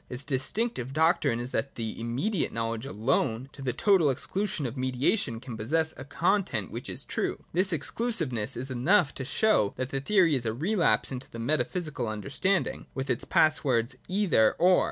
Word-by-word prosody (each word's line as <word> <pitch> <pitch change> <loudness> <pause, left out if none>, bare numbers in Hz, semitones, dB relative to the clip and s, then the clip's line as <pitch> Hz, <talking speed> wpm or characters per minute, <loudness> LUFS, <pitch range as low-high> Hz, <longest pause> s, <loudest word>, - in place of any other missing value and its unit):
Its 125 +2 -2
distinctive 135 - -1
doctrine 155 -6 +2
is 120 +2 -5
that 140 - -2
immediate 120 - -2
knowledge 115 +2 -3
alone, 125 0 0
to - - -11
the 130 -2 -1
total 185 - +3
exclusion 185 +5 -2
of 120 0 -4
mediation, 130 - 0
can 125 -1 -8
possess 160 +9 +1
a 130 - -8
con 185 +8 +1
tent 110 - -4
which - - -6
is - - -5
true. - - -3
This 185 +3 +4
exclusiveness 155 - -1
is 130 +2 -3
enough 140 +5 +3
to 130 - -5
show 135 - +2
that 130 0 -3
the 135 0 -3
theory 180 0 +3
is 125 -4 0
a 110 - -2
relapse 175 - +2
into 130 0 -6
the - - -9
metaphysical 150 +1 -1
understanding, 140 - -1
with 135 0 -2
its 120 - 0
pass 155 0 +3
words 125 -2 +1
' - - -30 0.2
Either 110 - +4
— - - -34
or.' 180 +2 +5
135 Hz, 185 wpm, -28 LUFS, 120-170 Hz, 0.2 s, or